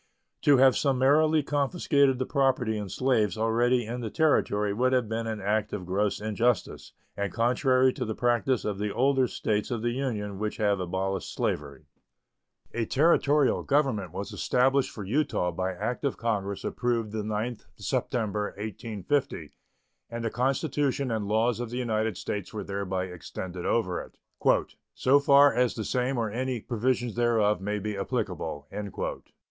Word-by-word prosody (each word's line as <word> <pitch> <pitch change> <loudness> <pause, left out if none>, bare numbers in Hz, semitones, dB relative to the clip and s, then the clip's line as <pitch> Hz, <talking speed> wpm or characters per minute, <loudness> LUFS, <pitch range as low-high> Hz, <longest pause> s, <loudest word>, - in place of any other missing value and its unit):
To 145 -2 +5
have 130 0 +6
summarily 145 +3 +3
confiscated 140 -1 +2
the 130 - -1
property 130 -5 +1
in 105 -2 -4
slaves 110 -4 +1
already 120 +2 +2
in 120 +3 -4
the 115 - -3
Territory 105 -10 +2
would 130 +4 +1
have 125 -3 +2
been 115 +1 -3
an 110 -1 -3
act 105 +1 -1
of 95 -3 -4
gross 100 +3 0
injustice 110 +3 -1 0.2
and 100 -2 -2
contrary 130 - +3
to 130 - -3
the 110 -2 -3
practice 120 0 +1
of 100 -2 -2
the 105 0 -1
older 130 +2 +2
States 105 -2 -1
of 120 -3 -3
the 120 - +1
Union 110 -7 -3
which 105 0 -3
have 100 -2 +1
abolished 95 +1 -2
slavery. 70 0 -3 0.9
A 115 -1 -1
Territorial 145 -1 +3
government 135 - +1
was 100 - -6
established 130 +2 +2
for 105 - -8
Utah 110 -5 0
by 95 +3 -2
act 110 +9 -4
of 140 - -1
Congress 100 -4 -2
approved 115 -3 -1
the 110 0 -2
9th 110 +3 -3
September, 105 -3 -2
1850, 110 +5 -3 0.6
and 115 0 -5
the 115 - -1
Constitution 135 +1 0
and 110 -3 -2
laws 110 +2 +1
of 120 -2 -4
the 120 - -5
United 110 -5 -1
States 100 -3 -4
were 110 - -5
thereby 95 -2 -3
extended 90 0 -6
over 90 -7 0
it - - -14 0.8
"so 135 +3 +4
far 140 0 +6
as 125 -1 +1
the 110 - -4
same 125 +1 0
or 115 -3 -1
any 125 +2 -2
provisions 120 +1 -1
thereof 110 -5 +2
may 105 +2 -2
be 105 +1 -3
applicable." 95 - -3
115 Hz, 160 wpm, -27 LUFS, 105-130 Hz, 0.9 s, have